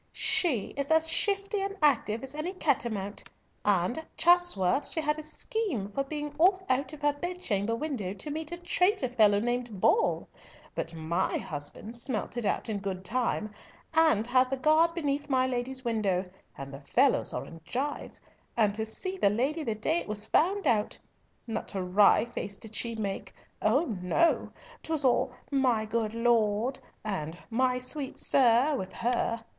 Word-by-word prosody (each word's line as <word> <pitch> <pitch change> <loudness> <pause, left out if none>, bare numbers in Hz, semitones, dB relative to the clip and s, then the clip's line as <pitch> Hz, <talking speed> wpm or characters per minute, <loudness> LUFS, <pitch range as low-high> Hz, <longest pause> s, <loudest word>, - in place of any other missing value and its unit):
"She 270 - +2
is 280 0 -2
as 320 0 +4
shifty 400 +3 +2
and 395 +1 -3
active 245 -6 +2
as 270 - -6
any 310 +5 -4
cat 295 -9 +1
a - - -1
mount; 200 -1 -4 0.4
and 200 - +1
at 320 - -14
Chatsworth 320 - +4
she - - -2
had 300 0 0
a - - -4
scheme 305 - -3
for 275 - -1
being 295 +1 -5
off 375 +2 +4
out 265 +3 +1
of 305 -1 -11
her 290 0 +3
bedchamber 275 - -2
window 240 -8 -3
to 250 +10 -5
meet 315 +1 -4
a 345 - -4
traitor 360 -2 +2
fellow 210 -4 +4
named 240 -2 -2
Boll; 455 - +2 0.5
but 165 0 -4
my 165 +3 -1
husband 150 +9 -5
smelt 240 -2 -1
it 240 -2 -2
out - - -1
in 215 -2 -2
good 190 -1 -5
time, 225 -2 -1 0.4
and 315 -9 +4
had 255 +1 +3
the 270 - -1
guard 315 +4 +3
beneath 290 -3 -2
my 260 -1 +3
lady's 260 +1 -3
window, 200 -5 0 0.3
and 135 0 -8
the 135 - -9
fellows 260 - +2
are - - -4
in 165 - -11
gyves, 265 - -4 0.4
and 210 -3 +3
to 220 +1 -3
see 370 - -4
the 200 - +4
lady 270 +10 0
the 225 -6 -2
day 315 +11 0
it - - -8
was 210 0 -3
found 380 - +2
out! 215 -6 +1 0.5
Not 225 -2 -4
a 190 - -1
wry 200 +4 +5
face 200 -4 -5
did 220 -1 -9
she 230 0 -1
make. 200 -2 -4 0.3
Oh 260 +10 +3 0.2
no! 330 - +2 0.3
'Twas 315 -3 -1
all 255 0 +3 0.2
my 255 -5 +2
good 225 0 -2
lord, 230 +1 +1 0.3
and 175 -6 -3
my 250 +2 +2
sweet 265 +2 -5
sir 260 +3 +4
with 190 -6 -5
her. 230 -1 -1
245 Hz, 175 wpm, -29 LUFS, 210-300 Hz, 0.5 s, wry